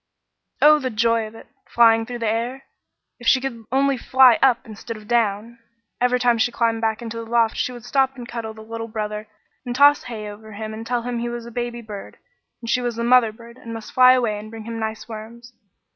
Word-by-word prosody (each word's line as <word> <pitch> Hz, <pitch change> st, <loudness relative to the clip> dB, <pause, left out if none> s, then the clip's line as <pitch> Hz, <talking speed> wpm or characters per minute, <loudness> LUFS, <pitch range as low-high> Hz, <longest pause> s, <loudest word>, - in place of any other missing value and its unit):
Oh, 300 Hz, 0 st, +7 dB
the 260 Hz, -2 st, -2 dB
joy 230 Hz, 0 st, +1 dB
of 215 Hz, -, -14 dB
it -, -, -12 dB, 0.2 s
flying 225 Hz, -1 st, +4 dB
through 245 Hz, -1 st, -5 dB
the 230 Hz, -1 st, -2 dB
air! 235 Hz, +5 st, -2 dB, 0.6 s
If 240 Hz, -, -7 dB
she 265 Hz, -, +6 dB
could 240 Hz, -4 st, -6 dB
only 275 Hz, 0 st, +2 dB
fly 260 Hz, -2 st, +5 dB
up 260 Hz, -1 st, +3 dB
instead 220 Hz, 0 st, -8 dB
of 210 Hz, -1 st, -14 dB
down! 230 Hz, 0 st, 0 dB, 0.4 s
Every 250 Hz, 0 st, +2 dB
time 240 Hz, -2 st, +2 dB
she 240 Hz, -, +2 dB
climbed 230 Hz, -1 st, 0 dB
back 220 Hz, +1 st, -1 dB
into 230 Hz, 0 st, -6 dB
the 230 Hz, -, -4 dB
loft 230 Hz, -1 st, +2 dB
she -, -, -1 dB
would 240 Hz, -2 st, -10 dB
stop 270 Hz, -1 st, +1 dB
and 245 Hz, -2 st, -9 dB
cuddle 230 Hz, -2 st, -6 dB
the 220 Hz, -, -11 dB
little 225 Hz, +1 st, -6 dB
brother 215 Hz, -1 st, -4 dB, 0.4 s
and 245 Hz, -2 st, -4 dB
toss 285 Hz, +2 st, +5 dB
hay 220 Hz, -4 st, -6 dB
over 215 Hz, +1 st, -10 dB
him 215 Hz, +1 st, -6 dB
and 225 Hz, +1 st, -7 dB
tell 240 Hz, -1 st, -1 dB
him 245 Hz, -1 st, -3 dB
he 240 Hz, 0 st, -2 dB
was 240 Hz, -1 st, -6 dB
a 235 Hz, -, -9 dB
baby 240 Hz, 0 st, -4 dB
bird, 210 Hz, -2 st, -9 dB, 0.5 s
and -, -, -6 dB
she 250 Hz, -, +2 dB
was 240 Hz, -1 st, -2 dB
the 235 Hz, -, -3 dB
mother 240 Hz, -2 st, +5 dB
bird, 235 Hz, +2 st, -15 dB
and 230 Hz, -1 st, -8 dB
must 225 Hz, -1 st, -8 dB
fly 255 Hz, 0 st, +7 dB
away 230 Hz, -5 st, 0 dB
and 215 Hz, +1 st, -10 dB
bring 225 Hz, 0 st, -9 dB
him 230 Hz, 0 st, -6 dB
nice 220 Hz, 0 st, -4 dB
worms. 235 Hz, +2 st, -10 dB
230 Hz, 235 wpm, -22 LUFS, 220-245 Hz, 0.6 s, Oh